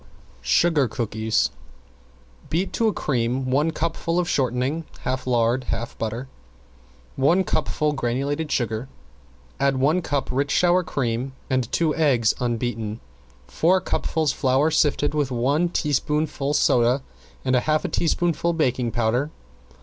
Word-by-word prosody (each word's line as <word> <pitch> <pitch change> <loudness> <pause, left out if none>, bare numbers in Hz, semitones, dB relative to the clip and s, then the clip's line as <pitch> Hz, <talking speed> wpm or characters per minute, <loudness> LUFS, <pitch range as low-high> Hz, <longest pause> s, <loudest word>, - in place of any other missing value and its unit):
~SUGAR 145 - +3
COOKIES~ 110 -1 0 1.0
Beat 180 +5 -1
to 230 - +2
a - - +3
cream 130 - -1
one 145 +5 +2
cupful 165 +1 -2
of 180 -1 +1
shortening, 135 +1 0 0.2
half 130 0 -3
lard 120 +1 +2
and 125 - -12
half 115 +1 -3
butter, 115 +4 -3 0.9
one 170 +8 +3
cupful 155 -3 0
granulated 140 +4 -2
sugar. 115 +1 -1 0.7
Add 140 -1 +2
one 150 +7 +2
cup 140 -4 -2
rich 140 +2 +1
sour 180 +1 +4
cream 130 -5 -2 0.2
and 130 -3 0
two 160 -2 +1
eggs 130 -9 +3
unbeaten, 115 -2 -2 0.5
four 165 - +2
cupfuls 160 -4 -1
flour 135 +4 +2
sifted 145 -1 +2
with 145 -3 0
one 140 +8 +1
teaspoonful 150 -1 0
soda 125 +2 +3 0.4
and 130 0 +2
a - - +5
half 155 0 +2
teaspoonful 170 +1 +1
baking 130 -6 0
powder. 120 +5 0
135 Hz, 130 wpm, -23 LUFS, 120-155 Hz, 1.0 s, a